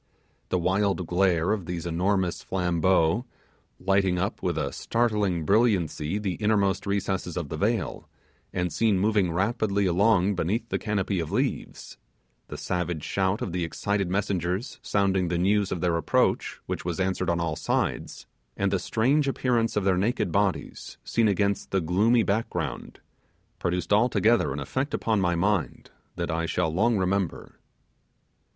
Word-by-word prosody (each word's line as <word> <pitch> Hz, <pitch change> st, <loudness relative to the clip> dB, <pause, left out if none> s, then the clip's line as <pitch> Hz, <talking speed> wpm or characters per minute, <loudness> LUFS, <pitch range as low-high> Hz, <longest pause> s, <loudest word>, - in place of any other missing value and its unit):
The 90 Hz, -, +1 dB
wild 95 Hz, +1 st, +1 dB
glare 90 Hz, -1 st, +2 dB
of 100 Hz, -6 st, -2 dB
these 90 Hz, -1 st, -4 dB
enormous 90 Hz, +2 st, 0 dB
flambeaux, 90 Hz, +2 st, +1 dB, 0.6 s
lighting 95 Hz, -1 st, +2 dB
up 95 Hz, +3 st, -2 dB
with -, -, -1 dB
a -, -, -2 dB
startling 105 Hz, -8 st, 0 dB
brilliancy 90 Hz, -5 st, +1 dB
the 100 Hz, -3 st, -2 dB
innermost 100 Hz, -3 st, +1 dB
recesses 95 Hz, -3 st, -2 dB
of 80 Hz, -5 st, -3 dB
the -, -, -4 dB
vale, 105 Hz, +3 st, -1 dB, 0.4 s
and 90 Hz, -2 st, -2 dB
seen 110 Hz, -4 st, +2 dB
moving 100 Hz, -2 st, +2 dB
rapidly 100 Hz, +2 st, 0 dB
along 95 Hz, +1 st, +3 dB
beneath 100 Hz, +6 st, -1 dB
the -, -, -1 dB
canopy 100 Hz, -3 st, -1 dB
of 80 Hz, -, -4 dB
leaves, -, -, -3 dB, 0.5 s
the -, -, -7 dB
savage 90 Hz, -3 st, -2 dB
shout 95 Hz, +1 st, 0 dB
of 95 Hz, -, -4 dB
the 90 Hz, 0 st, -1 dB
excited 100 Hz, +3 st, -1 dB
messengers 95 Hz, -, -2 dB
sounding 95 Hz, -2 st, +1 dB
the 85 Hz, 0 st, -1 dB
news 100 Hz, +2 st, +2 dB
of 85 Hz, -, -2 dB
their 90 Hz, -2 st, +1 dB
approach, 85 Hz, -, +1 dB
which -, -, -4 dB
was 90 Hz, 0 st, -3 dB
answered 95 Hz, -1 st, 0 dB
on 85 Hz, 0 st, +1 dB
all 85 Hz, -2 st, -1 dB
sides, -, -, -2 dB, 0.3 s
and -, -, +1 dB
the -, -, +1 dB
strange 140 Hz, +6 st, +1 dB
appearance 120 Hz, -4 st, 0 dB
of 105 Hz, -, +1 dB
their 95 Hz, -1 st, +2 dB
naked 100 Hz, -2 st, 0 dB
bodies, 100 Hz, 0 st, -2 dB
seen 115 Hz, -2 st, +1 dB
against 100 Hz, 0 st, 0 dB
the 95 Hz, -, +1 dB
gloomy 105 Hz, +8 st, +3 dB
background, 95 Hz, -, -3 dB, 0.6 s
produced 90 Hz, +1 st, -1 dB
altogether 115 Hz, +1 st, +3 dB
an -, -, -4 dB
effect 135 Hz, +2 st, -2 dB
upon 110 Hz, -3 st, 0 dB
my 90 Hz, -2 st, +1 dB
mind 95 Hz, 0 st, -1 dB, 0.2 s
that 85 Hz, -1 st, -2 dB
I 85 Hz, +1 st, -1 dB
shall 80 Hz, -1 st, 0 dB
long 110 Hz, +6 st, +2 dB
remember. 95 Hz, -1 st, -2 dB
95 Hz, 155 wpm, -26 LUFS, 90-105 Hz, 0.6 s, along